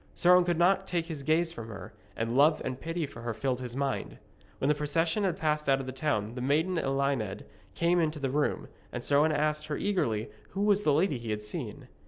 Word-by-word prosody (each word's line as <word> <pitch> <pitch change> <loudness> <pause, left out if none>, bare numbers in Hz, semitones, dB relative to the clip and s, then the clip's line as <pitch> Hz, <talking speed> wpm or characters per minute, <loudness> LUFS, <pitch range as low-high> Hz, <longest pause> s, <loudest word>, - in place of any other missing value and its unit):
Sir 180 +1 +5
Owen 180 0 +6
could 175 -2 +1
not 190 +3 +3
take 170 -2 -1
his 160 -4 -6
gaze 160 +4 +2
from 115 -10 -8
her, 105 -1 -9 0.2
and 115 +1 -1
love 150 +3 +5
and 130 0 -3
pity 165 0 -2
for 120 -4 -10
her 120 -1 -3
filled 130 +1 -1
his 125 -1 -6
mind. 135 -1 -2 0.4
When 135 - -1
the 150 - +5
procession 165 +6 0
had 185 -4 0
passed 150 -2 0
out 135 0 +4
of 135 - -5
the 130 - -4
town 130 -6 -1
the 125 - -5
maiden 160 +7 +1
Elined 135 -8 -1 0.3
came 170 +8 +2
into 160 -2 0
the 135 -3 -2
room, 150 +1 0 0.2
and - - -5
Sir 140 - +3
Owen 155 +1 +4
asked 150 0 0
her 150 - -2
eagerly 115 - -1 0.3
who - - 0
was 205 0 +3
the 150 - +3
lady 150 -2 +2
he 115 -1 -6
had 105 0 -2
seen. 105 - -6
150 Hz, 235 wpm, -29 LUFS, 130-165 Hz, 0.4 s, Owen